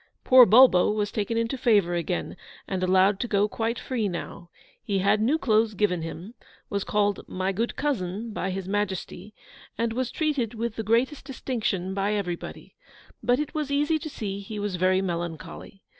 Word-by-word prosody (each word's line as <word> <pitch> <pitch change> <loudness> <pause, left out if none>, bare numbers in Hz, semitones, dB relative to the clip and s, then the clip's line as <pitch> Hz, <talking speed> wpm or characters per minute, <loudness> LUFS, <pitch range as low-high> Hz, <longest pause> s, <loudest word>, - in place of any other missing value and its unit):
Poor 255 -2 +8
Bulbo 220 -4 +6
was 210 -1 -1
taken 220 +2 -2
into 230 +3 -1
favour 205 -8 +3
again, 175 +1 -2 0.3
and 190 -2 -3
allowed 190 +2 +3
to 240 - -2
go 205 -1 +2
quite 225 +2 -2
free 235 -5 -2
now. 170 -1 -7 0.3
He 205 -3 -1
had 200 +2 +2
new 265 +8 +2
clothes 220 -6 +2
given 180 -4 +1
him, 165 +6 -7 0.4
was 200 -1 -1
called 205 -1 +1
'My 185 +1 -2
good 225 +5 -2
cousin' 220 -5 -2
by 190 - -2
His 190 0 -4
Majesty, 200 0 -3 0.4
and 230 0 -1
was 255 +1 -1
treated 285 -8 -1
with 225 0 -3
the - - -3
greatest 235 +7 +1
distinction 220 -8 -3
by 200 +1 0
everybody. 180 -4 -5 0.5
But 245 0 +2
it 300 +1 -3
was 305 -3 -2
easy 295 +3 +1
to 310 - -6
see 200 -7 -5
he 205 +2 -7
was 205 -2 -2
very 185 +1 +2
melancholy. 175 +2 -6
210 Hz, 175 wpm, -26 LUFS, 190-235 Hz, 0.5 s, Poor